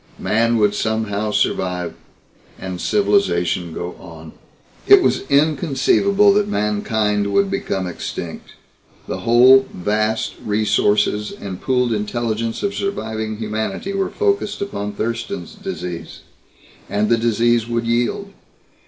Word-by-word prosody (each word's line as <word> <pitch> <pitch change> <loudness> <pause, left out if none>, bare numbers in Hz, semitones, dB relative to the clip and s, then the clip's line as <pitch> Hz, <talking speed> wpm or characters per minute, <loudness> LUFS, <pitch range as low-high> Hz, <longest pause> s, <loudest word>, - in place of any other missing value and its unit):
Man 115 +2 +1
would 105 -2 +3
somehow 110 -1 -1
survive, 90 -4 -1 0.6
and 95 -2 -6
civilization 90 - +1
go 85 +2 -5
on. 80 -3 -11 0.6
It - - +8
was 130 - 0
inconceivable 160 +7 +3
that 205 0 +2
mankind 105 - 0
would 200 - +2
become 195 - -2
extinct. 90 - -6 0.5
The - - -4
whole 130 +3 +6
vast 110 +4 -1
resources 105 0 +1
and 95 -2 -8
pooled 125 -2 +1
intelligence 115 - -2
of 200 0 0
surviving 110 - -3
humanity 110 - -3
were 195 -1 -1
focused 400 - -1
upon 105 - -4
Thurston's 115 - -4
Disease. 185 - -7 0.7
And 105 +1 0
the 115 - +4
disease 115 0 +2
would 115 0 -1
yield. 120 +13 -1
110 Hz, 115 wpm, -20 LUFS, 105-140 Hz, 0.7 s, It